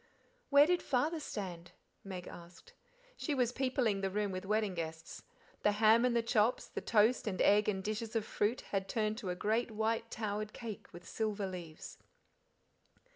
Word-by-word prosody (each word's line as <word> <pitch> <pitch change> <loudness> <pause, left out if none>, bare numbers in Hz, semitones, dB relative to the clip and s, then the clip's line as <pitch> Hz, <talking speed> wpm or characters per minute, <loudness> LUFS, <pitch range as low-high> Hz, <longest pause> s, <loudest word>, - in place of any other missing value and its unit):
"Where 285 0 +8
did 355 +2 +2
Father 300 +6 0
stand?" 180 - -6 0.3
Meg 185 -2 -7
asked. 175 - -12 0.4
She 300 - -1
was 245 -3 +2
peopling 250 -6 0
the 195 - 0
room 205 +1 -1
with 185 0 -5
wedding 210 -1 +1
guests; 160 -1 -6 0.4
the 210 - +3
ham 220 +3 +5
and 245 -1 +2
the 235 - +2
chops, 230 0 +2
the - - -6
toast 225 +2 +3
and 190 -3 -2
eggs 210 +1 +5
and 190 -2 -2
dishes 215 +2 -3
of 220 -2 +1
fruit, 215 +4 0
had 195 -1 -1
turned 215 0 0
to 200 -7 -4
a 180 - -1
great 220 +6 0
white 225 +1 -1
towered 215 -1 -3
cake 225 -4 -7
with 175 +1 -12
silver 215 -2 -2
leaves. 175 -4 -8
215 Hz, 175 wpm, -34 LUFS, 195-235 Hz, 0.4 s, Where